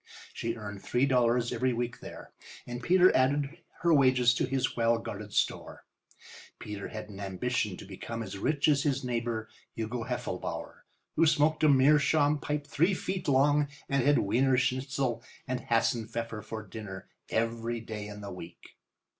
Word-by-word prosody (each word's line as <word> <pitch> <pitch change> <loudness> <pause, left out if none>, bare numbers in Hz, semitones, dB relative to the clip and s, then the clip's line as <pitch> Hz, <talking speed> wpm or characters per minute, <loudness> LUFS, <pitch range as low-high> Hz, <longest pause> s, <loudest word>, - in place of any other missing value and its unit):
She 115 0 -3
earned 100 -3 -7
three 125 +3 +1
dollars 120 -2 +2
every 125 +2 +1
week 120 0 -3
there, - - -10 0.3
and 120 0 -6
Peter 185 +3 +5
added 140 +4 +1 0.2
her 170 -1 +4
wages 130 -4 +5
to 125 - 0
his 135 0 -1
well 115 0 +3
guarded 105 -2 -7
store. - - -1 0.7
Peter 105 -1 -6
had 110 -1 -7
an 100 -1 -10
ambition 100 +1 -2
to - - -10
become 115 +4 -6
as 110 - -7
rich 140 +8 +1
as 145 -2 +4
his 140 -2 0
neighbour, 115 -2 -2 0.3
Hugo 115 +1 -3
Heffelbauer, 125 0 -5 0.3
who 165 +1 +4
smoked 155 +1 +3
a 155 - +6
meerschaum 145 +2 +4
pipe 145 0 -3
three 170 +6 +2
feet 185 +1 -4
long 145 +2 +4 0.2
and 140 -1 +1
had 145 +2 +4
wiener 130 +6 +2
schnitzel 130 -1 0 0.3
and 130 0 -1
hassenpfeffer 115 -1 0
for 110 -1 -6
dinner 95 -2 -8 0.2
every 115 +1 -1
day 110 -2 -6
in 105 0 -8
the 100 - -7
week. 90 -2 -11
125 Hz, 160 wpm, -30 LUFS, 110-140 Hz, 0.7 s, a